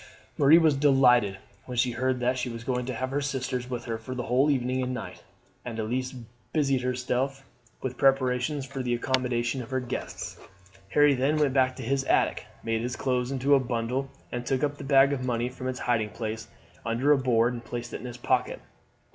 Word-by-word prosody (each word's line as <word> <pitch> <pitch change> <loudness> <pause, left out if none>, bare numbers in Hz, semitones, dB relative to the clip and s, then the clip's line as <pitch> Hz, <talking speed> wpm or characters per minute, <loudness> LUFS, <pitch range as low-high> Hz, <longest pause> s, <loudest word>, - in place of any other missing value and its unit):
Marie 145 +3 +7
was 160 -4 +4
delighted 125 -8 +4 0.3
when 125 -1 -5
she 125 +1 +3
heard 130 +1 0
that 125 +1 +1
she 125 0 -2
was 115 -1 -7
going 125 0 -2
to 130 - -2
have 130 +3 -3
her 145 +1 0
sisters 130 -2 -3
with 120 -2 -4
her 115 -1 -3
for 130 +3 -7
the 125 - -3
whole 130 +5 +2
evening 130 -2 +1
and 125 0 -2
night, - - -7 0.4
and 115 -2 -6
Elise 125 +4 -2 0.4
busied 140 -4 +2
herself 125 +2 -1 0.4
with 130 -1 -4
preparations 135 +1 +2
for 135 0 -5
the 120 -1 0
accommodation 125 0 0
of 120 - -9
her 130 -1 0
guests. 125 -1 -5 0.5
Harry 145 +4 +5
then 135 +4 +1
went 145 -3 +2
back 130 -1 +3
to 130 - -7
his 135 +3 0
attic, - - +1 0.2
made 115 0 -1
his 125 +1 -3
clothes 125 -2 0
into 135 +1 +2
a 140 - +7
bundle, 125 +2 -2 0.2
and 120 0 -3
took 130 +3 -1
up 145 0 0
the - - -6
bag 140 0 +5
of 130 -2 -3
money 120 -1 -1
from 130 0 -6
its 130 0 -4
hiding 115 -3 +1
place 110 0 -5 0.4
under 120 +5 +1
a 145 - +6
board 120 -2 +2
and 120 -1 -6
placed 120 0 -6
it - - -4
in 125 - -7
his 120 0 -7
pocket. 120 - 0
130 Hz, 210 wpm, -27 LUFS, 120-135 Hz, 0.5 s, Marie